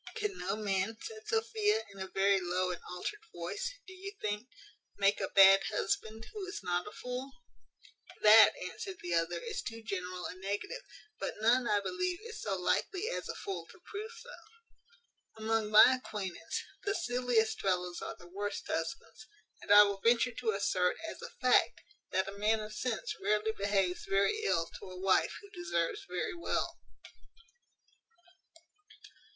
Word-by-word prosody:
"Can 420 -3 -2
no 195 +2 -1
man," 205 0 -1
said 440 -1 -9
Sophia, 440 - +1
in 195 - -12
a 190 - -4
very 195 +1 +3
low 180 +1 0
and 175 - -6
altered 180 - -5
voice, 485 - -4
"do 375 - -11
you 385 +1 -7
think, 210 +3 -3 0.5
make 200 0 +3
a - - 0
bad 195 0 +8
husband, 220 +2 -2
who 420 -2 -5
is 390 +2 -5
not 175 +1 -1
a - - -7
fool?" 250 +2 -5 0.9
"That," 215 +1 +9
answered 385 -6 -6
the 175 - -2
other, 170 +1 +1
"is - - -4
too 230 0 -7
general 185 -3 -4
a - - -4
negative; 200 - -4 0.4
but - - -3
none, 240 +3 +4
I 205 -1 +3
believe, 360 - -1
is 450 -1 -8
so 195 -2 -1
likely 375 - 0
as - - -4
a - - -3
fool 395 -2 -5
to - - -16
prove 425 +2 -7
so. - - -11 1.1
Among 220 -1 0
my 235 +4 +8
acquaintance, 190 -5 -4 0.2
the 405 0 0
silliest 245 - +1
fellows 180 -2 -1
are - - -5
the 175 - -14
worst 205 +3 -4
husbands; 220 +7 -4 0.3
and - - -4
I 205 0 +11
will 200 -1 -1
venture 235 +2 +3
to 230 0 -2
assert, 185 -2 +1
as - - -7
a - - -6
fact, 250 -2 +3 0.3
that 190 +1 0
a - - -4
man 215 +2 +3
of 215 0 -6
sense 225 +1 -2
rarely 210 +2 +1
behaves 195 -3 0
very 200 - +2
ill 165 - +2
to - - -10
a 185 0 -9
wife 190 0 +2
who 405 -1 -15
deserves 385 +2 -1
very 430 - -2
well." 340 -1 -2
215 Hz, 165 wpm, -32 LUFS, -, 1.1 s, I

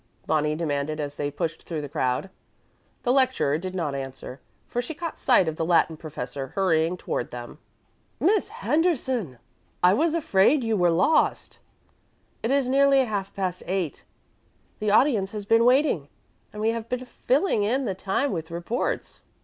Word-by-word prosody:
Bonnie 150 -1 +1
demanded 155 -1 -2
as 145 -1 -3
they 145 0 -3
pushed 155 +3 -3
through 165 -3 -5
the 145 - -5
crowd. 130 +6 -1 0.7
The 245 - +2
lecturer 255 - +2
did 185 +1 -6
not 160 -6 -1
answer, 135 -1 -7 0.3
for 245 - -2
she 270 +6 -7
caught 335 0 -5
sight 240 -9 +4
of 160 0 -2
the - - -1
Latin 165 -1 +3
professor 135 -3 -6
hurrying 175 -2 +2
toward 120 - -3
them. 120 +4 -9 0.6
"Miss 405 +3 +2
Henderson! 295 - 0 0.5
I 180 +1 +6
was 320 +8 +2
afraid 265 -2 +3
you 225 -1 +1
were 175 -3 +3
lost. 175 - +1 0.8
It 225 - -1
is 275 -1 +2
nearly 275 0 +4
half 200 -4 -3
past 185 -2 -2
eight. 180 -5 -2 0.8
The 210 - 0
audience 215 -3 +3
has 210 -2 -5
been 225 +2 +4
waiting, 250 - +3 0.4
and 210 0 -6
we 220 - +3
have 230 0 -3
been 250 0 -3
filling 260 - +1
in 250 +6 +1
the 195 - -1
time 195 +9 -1
with 160 -2 -4
reports." 175 +8 -3
195 Hz, 165 wpm, -25 LUFS, 155-255 Hz, 0.8 s, I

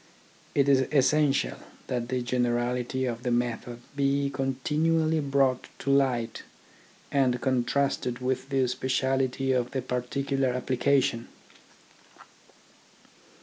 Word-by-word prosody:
It 140 -1 +3
is 130 -2 +4
essential 145 0 +2 0.3
that 120 -1 -3
the 125 -1 -1
generality 125 +1 0
of 120 -2 -3
the 125 - -2
method 120 0 -2
be 140 0 +1
continually 155 +5 +1
brought 135 -3 +1
to 140 - -1
light 125 -5 +1 0.7
and 130 -3 +2
contrasted 130 -1 0
with 130 +1 -2
the 135 -2 +2
speciality 130 +1 0
of 125 -1 +1
the 130 0 -2
particular 130 +1 -1
application. 125 -1 +1
130 Hz, 105 wpm, -27 LUFS, 125-140 Hz, 0.7 s, is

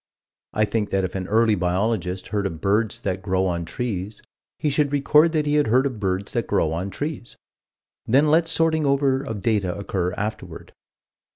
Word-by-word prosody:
I 110 - +2
think 105 0 -2
that 95 -1 0
if 90 - -3
an 95 -1 -4
early 110 +1 +3
biologist 95 0 -1
heard 100 -2 -1
of 80 -4 -7
birds 105 +4 0
that 95 0 -2
grow 95 -1 0
on 85 -2 -2
trees, 105 0 -4 0.4
he 150 - 0
should 145 0 +1
record 150 +3 +4
that 155 -2 +1
he 145 - 0
had 150 -1 +3
heard 130 +5 +3
of 130 -6 -3
birds 95 0 -2
that 120 -3 -2
grow 80 -6 +1
on 90 +4 -3
trees: 145 +1 -5 0.7
then 140 +6 +4
let 165 +1 +4
sorting 160 -1 +2
over 135 -1 +2
of 110 -8 -6
data 100 -6 0
occur 95 -3 -2
afterward. 105 +2 -6
110 Hz, 185 wpm, -23 LUFS, 95-140 Hz, 0.7 s, record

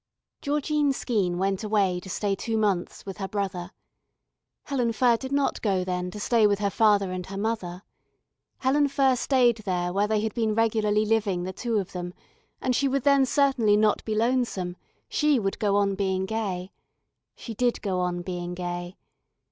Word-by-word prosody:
Georgine 295 0 +1
Skeene 200 -10 -1
went 195 +1 -1
away 200 -4 +1
to 190 - -11
stay 200 +2 -1
two 225 +3 -2
months 200 -5 -1
with 195 -2 -7
her 195 - -3
brother. 190 -3 -3 0.9
Helen 250 -5 -1
Furr 240 0 +4
did 265 +3 -6
not 280 0 0
go 195 -4 +1
then 180 0 -2
to 210 - -8
stay 220 0 +3
with 205 -1 +1
her 200 -1 -1
father 205 -4 +3
and 185 0 -5
her 195 - -6
mother. 200 -4 -3 0.7
Helen 285 +2 +2
Furr 270 -2 +2
stayed 245 -1 +3
there 180 -4 -2
where 200 +2 +2
they 215 -1 +1
had 220 0 -2
been 220 -3 0
regularly 215 -2 +2
living 210 -5 +1
the 185 +1 -4
two 230 +2 -2
of 195 -3 -2
them 180 0 -6 0.4
and 255 - 0
she 280 - +2
would 270 -1 0
then 280 -2 +4
certainly 255 -7 +3
not 210 -1 +2
be 220 - -2
lonesome, 225 -6 0 0.3
she 300 -2 +2
would 195 -4 -2
go 205 -3 +1
on 200 -1 +2
being 190 -1 -1
gay. 195 -3 -3 0.6
She 230 - -8
did 245 +2 0
go 190 -3 -1
on 175 -1 -1
being 175 -1 -4
gay. 175 0 -5
210 Hz, 180 wpm, -26 LUFS, 185-235 Hz, 0.9 s, Furr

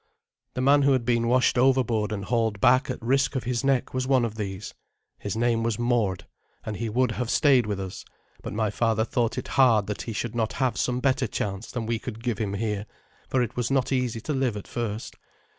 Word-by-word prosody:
The 125 - -1
man 140 +2 +5
who 140 0 +4
had 125 -3 0
been 120 -1 +1
washed 125 0 +3
overboard 120 -5 +2
and 100 -2 -3
hauled 115 -3 0
back 130 +7 +4
at 125 - -3
risk 135 +3 +1
of 130 - -1
his 120 +1 -1
neck 135 -2 +1
was 130 0 -1
one 130 -3 +3
of 110 - -4
these. 100 -2 -5 0.5
His 100 +1 -4
name 115 -1 +2
was 115 -2 -1
Mord, 115 -8 0 0.4
and 105 -2 -4
he 115 -1 -3
would 125 +2 +1
have 120 0 -3
stayed 130 -6 +4
with 100 -2 -2
us; 95 -1 -6 0.4
but - - -6
my 110 -1 0
father 110 0 +1
thought 115 -1 -1
it 125 - -4
hard 120 -6 +4
that 105 0 -4
he 115 - -5
should 115 +1 -3
not 115 -2 -1
have 125 -4 0
some 125 0 -1
better 135 -1 +1
chance 100 +1 -4
than 120 -3 -4
we 115 0 -1
could 115 -1 -7
give 120 -1 -1
him 100 -3 -2
here, 105 0 -2 0.4
for 130 -2 +2
it 120 - -5
was 120 -1 -1
not 135 -1 +1
easy 125 -3 0
to 150 - -3
live 130 -5 0
at 100 - -8
first. 115 -2 -4
120 Hz, 225 wpm, -26 LUFS, 110-125 Hz, 0.5 s, man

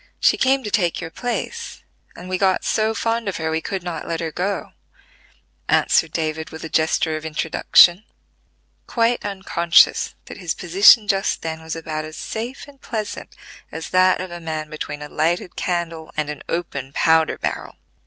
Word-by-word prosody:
She - - +4
came 265 0 +2
to 210 - -5
take 175 -6 +1
your 165 -2 -6
place, 250 - -4 0.3
and 180 - -10
we 185 0 -2
got 190 -2 +2
so 220 0 +1
fond 230 -2 -1
of 195 - -4
her 160 -1 -2
we 160 0 -1
could 190 +2 -4
not 170 -3 -5
let 165 -1 -2
her 165 -2 -3
go," 195 +5 -3 1.0
answered - - +3
David 160 -1 -3
with 160 - -9
a 160 - -5
gesture 160 0 +1
of 155 - -5
introduction, 160 +4 +4 0.8
quite 235 0 +1
unconscious 180 -4 +3
that - - -10
his 175 -4 -3
position 200 +5 +6
just 195 0 0
then 160 0 -4
was 160 0 -5
about 155 -1 -4
as 155 0 -9
safe 240 +6 -5
and 280 -1 -17
pleasant 215 -3 -5 0.4
as 160 0 -6
that 185 0 +4
of 185 -1 -5
a 175 - -6
man 155 -2 -5
between 150 -1 -5
a - - -7
lighted 165 +4 -1
candle 165 -3 -3
and 150 -1 -1
an 150 - -8
open 140 -6 -4
powder 160 +1 +3
barrel. - - -4
170 Hz, 175 wpm, -21 LUFS, 160-200 Hz, 1.0 s, position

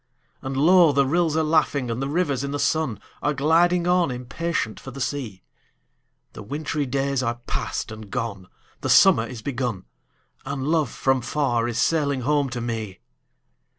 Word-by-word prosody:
And 135 0 -4
low 170 +2 +6
the 140 0 +3
rills 160 +2 +1
are 160 - +2
laughing, 150 -5 +1
and 115 +3 -3
the 135 - -1
rivers 145 -4 0
in 140 - -3
the 145 - -2
sun 155 -6 0 0.2
Are 150 0 0
gliding 170 +5 +3
on, 180 -3 +3
impatient 125 0 -3
for - - -9
the 135 +1 -9
sea; 130 -8 -4 0.9
The - - -9
wintry 145 +5 -3
days 135 +1 0
are 120 -2 -1
past - - -3
and 110 -2 -9
gone, 100 -2 -4 0.3
the - - -3
summer 115 +1 +6
is 120 -4 -9
begun, 125 -8 -3 0.6
And 135 -2 -4
love 155 -4 +2
from 135 +2 0
far 120 -3 0
is 120 -1 -3
sailing 140 0 +1
home 145 +1 +1
to 120 -1 -4
me! 110 -5 -4
135 Hz, 170 wpm, -24 LUFS, 120-155 Hz, 0.9 s, low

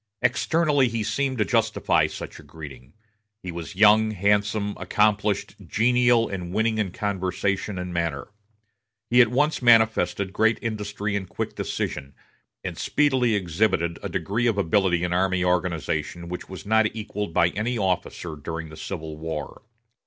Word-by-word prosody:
Externally 145 +2 +2
he 115 -2 -2
seemed 130 +5 -1
to 105 - +2
justify 115 -4 +2
such - - -8
a - - -13
greeting. 70 -4 -11 0.5
He 90 - -5
was 85 +3 -7
young, 110 +2 +6
handsome, 105 +1 +1
accomplished, 105 -1 +1
genial 120 0 +3
and 90 -3 -5
winning 110 +2 +1
in 105 -3 0
conversation 95 +1 -2
and 90 0 -5
manner. 85 -1 -2 0.8
He 125 +1 +7
at 120 - +6
once 145 +7 +1
manifested 110 -4 +3
great 110 +1 +3
industry 105 -2 -3
and 95 -3 -3
quick - - -4
decision, 70 +1 -4 0.5
and - - -5
speedily 130 -6 +2
exhibited 85 -2 0
a - - -4
degree 115 +5 -1
of 110 -3 +1
ability 95 -2 +2
in 90 0 -1
army 95 0 +1
organization 85 -1 -1
which 90 - -6
was 95 +1 -8
not 110 +1 +4
equaled 105 -3 -4
by 85 +1 +3
any 115 +6 -2
officer 90 -4 -2
during 80 +2 -6
the 80 - -11
Civil 80 -5 -6
War. 80 -1 -5
100 Hz, 150 wpm, -24 LUFS, 90-110 Hz, 0.8 s, He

